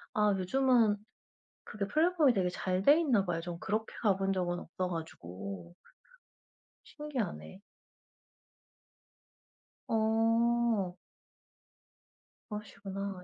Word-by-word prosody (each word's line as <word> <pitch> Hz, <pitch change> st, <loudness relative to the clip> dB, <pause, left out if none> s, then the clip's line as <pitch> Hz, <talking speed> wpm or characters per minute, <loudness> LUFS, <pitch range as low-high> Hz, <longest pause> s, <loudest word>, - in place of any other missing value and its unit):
아 210 Hz, -1 st, +4 dB
요즘은 230 Hz, +1 st, +3 dB, 0.7 s
그게 205 Hz, -1 st, -4 dB
플랫폼이 310 Hz, -1 st, +3 dB
되게 185 Hz, -3 st, +1 dB
잘 185 Hz, +1 st, -1 dB
돼 285 Hz, +9 st, +6 dB
있나 240 Hz, -11 st, +2 dB
봐요. 170 Hz, -2 st, -2 dB
전 170 Hz, 0 st, -6 dB
그렇게 215 Hz, +3 st, -2 dB
가본 195 Hz, -3 st, +2 dB
적은 175 Hz, -1 st, -1 dB
없어 180 Hz, +2 st, -4 dB
가지고 95 Hz, -, -7 dB, 1.1 s
신기하네. 250 Hz, -, -5 dB, 2.3 s
어. 225 Hz, -2 st, +2 dB, 1.5 s
그러시구나. 200 Hz, -2 st, -6 dB
200 Hz, 185 characters per minute, -32 LUFS, 180-230 Hz, 2.3 s, 돼